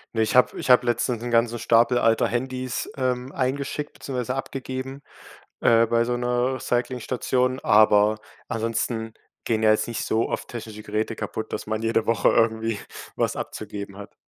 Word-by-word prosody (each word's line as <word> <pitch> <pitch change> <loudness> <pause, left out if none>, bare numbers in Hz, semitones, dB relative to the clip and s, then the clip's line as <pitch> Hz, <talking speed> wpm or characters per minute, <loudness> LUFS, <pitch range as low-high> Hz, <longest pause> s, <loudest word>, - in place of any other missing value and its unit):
Ne, 110 - +2
ich 110 - -1
habe 125 - +4
ich - - -4
habe 125 -1 +6
letztens 120 0 0
'n 120 - -3
ganzen 115 0 +2
Stapel 120 +2 +3
alter 115 -2 +3
Handys, 130 0 -3
ähm, 130 0 -1
eingeschickt 140 +2 -2
beziehungsweise 125 -1 -4
abgegeben, 135 0 -5 0.6
äh, 115 0 +5
bei 115 +1 +2
so 120 +1 -1
'ner 125 +1 0
Recycling-Station, 125 +1 -1
aber 105 0 +5 0.3
ansonsten 115 -1 -2 0.3
gehen 110 -1 0
ja 110 - +5
jetzt 110 - +2
nicht 120 - -3
so 110 +1 0
oft - - -4
technische 110 -2 -8
Geräte 110 +1 -2
kaputt, 110 0 -5
dass - - -4
man 110 0 -1
jede 115 0 0
Woche 115 -3 +3
irgendwie 110 -1 +1 0.3
was - - 0
abzugeben 100 -1 -6
hat. 100 0 -10
115 Hz, 165 wpm, -24 LUFS, 110-125 Hz, 0.6 s, habe